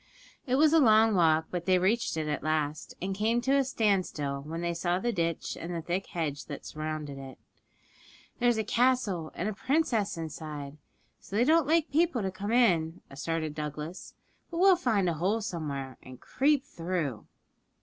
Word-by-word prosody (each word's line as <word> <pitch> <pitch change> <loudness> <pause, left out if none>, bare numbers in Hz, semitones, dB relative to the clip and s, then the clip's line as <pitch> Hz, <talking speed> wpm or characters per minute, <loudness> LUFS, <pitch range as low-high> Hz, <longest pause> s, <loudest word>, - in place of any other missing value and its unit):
It 255 - +2
was 305 +3 +5
a 325 - +7
long 220 -4 +5
walk, 160 -3 +3
but 175 0 -4
they 185 -1 +5
reached 190 0 +1
it 155 -1 -2
at 150 -2 -2
last, 155 -1 -2
and 190 +2 -2
came 220 +4 +1
to 265 +3 +2
a 275 - +4
standstill 185 - 0
when 160 +4 -5
they 170 0 -1
saw 175 +1 0
the 240 +5 -1
ditch 170 -5 -2
and 175 +1 -5
the 165 - -3
thick 180 +4 -2
hedge 150 -4 -3
that 145 - -8
surrounded 155 -2 -5
it. 135 -1 -9 1.0
'There's 240 -2 +3
a 220 - +1
castle 215 -8 +1
and 180 - -2
a 215 - -1
princess 245 - 0
inside, 150 -2 -6 0.4
so 195 - -9
they 225 - +4
don't 315 +2 +4
like 325 0 +2
people 310 -6 +2
to 190 - -1
come 200 +3 -4
in,' 175 -10 +2
asserted 155 +2 -3
Douglas; 150 +3 -6 0.3
'but 335 - -6
we'll 380 +1 +6
find 220 - +1
a 170 - +1
hole 185 +8 0
somewhere 145 - -5
and 130 -1 -12
creep 280 - +1
through.' 165 -10 -3
180 Hz, 180 wpm, -29 LUFS, 155-235 Hz, 1.0 s, a